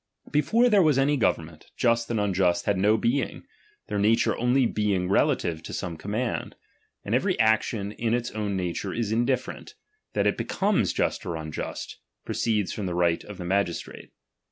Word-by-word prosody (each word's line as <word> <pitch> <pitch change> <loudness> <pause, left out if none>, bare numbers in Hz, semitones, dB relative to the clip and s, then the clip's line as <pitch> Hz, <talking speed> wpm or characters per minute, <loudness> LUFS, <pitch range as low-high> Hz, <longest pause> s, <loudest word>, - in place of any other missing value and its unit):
Before 225 +11 +3
there 210 -4 +5
^H - - +4
was 150 -4 +4
any 140 +2 +3
government, 80 - -1
just 115 -1 +2
and 115 -2 0
unjtist 95 -3 +1
had 100 - +2
no 105 +4 +3
^H - - -6
being, 125 +4 0 0.4
their 105 - -2
nature 110 +3 +3
only 125 +2 +2
being 100 -5 0
relative 85 -4 +1
to - - -8
some 85 - -4
^H - - -16
command: 110 +6 -3 0.5
and 100 - -2
every 180 +9 +1
action 110 -2 +2
in 115 +1 0
its 120 -1 -3
own 105 -2 -2
nature 90 +1 -3
is 110 -2 -1
^H 120 +2 +1
indiflFerent; 130 -2 -3 0.4
that - - +1
it - - +2
becomes 195 - +1
just - - -1
or 85 - -4
unjust, 80 -1 -6 0.3
pro - - -3
^H - - -5 0.3
ceeds - - -5
from 100 -3 -3
the 90 - -3
right 85 -1 +1
of 105 -2 -10
the 90 - -6
magistrate. 95 -2 -2
105 Hz, 195 wpm, -26 LUFS, 90-120 Hz, 0.5 s, there